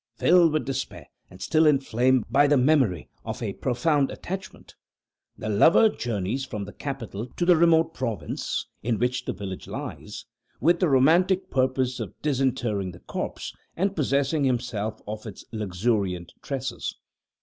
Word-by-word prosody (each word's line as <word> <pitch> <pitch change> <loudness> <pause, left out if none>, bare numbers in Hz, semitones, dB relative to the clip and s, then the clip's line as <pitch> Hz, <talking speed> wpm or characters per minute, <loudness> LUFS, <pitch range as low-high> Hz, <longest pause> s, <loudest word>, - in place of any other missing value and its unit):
Filled 175 -2 +5
with 155 - 0
despair, 135 -1 -4 0.2
and 90 - -14
still 155 - +3
inflamed 130 -3 +3
by 145 +1 +4
the 145 0 +4
memory 125 - +2 0.2
of - - -5
a - - -2
profound 135 +3 +1
attachment, 190 +1 -7 0.6
the 110 - -5
lover 160 - +5
journeys 115 - -2
from 105 -6 -5
the 100 - -10
capital 120 -6 -5
to 175 - 0
the 175 0 +6
remote 165 0 +4
province 115 -5 -3 0.2
in 115 0 0
which 125 +2 -1
the - - -1
village 95 -1 -7
lies, - - -7 0.3
with 170 +6 +3
the 180 - +2
romantic 180 +8 +3
purpose 130 -1 +1
of 105 -6 -7
disinterring 125 -9 0
the 85 - -13
corpse, - - -5 0.2
and 195 +3 0
possessing 140 0 +1
himself 120 -5 -1
of 110 +2 -6
its 105 - -9
luxuriant 100 -3 -1
tresses. - - -4
130 Hz, 150 wpm, -26 LUFS, 110-155 Hz, 0.6 s, the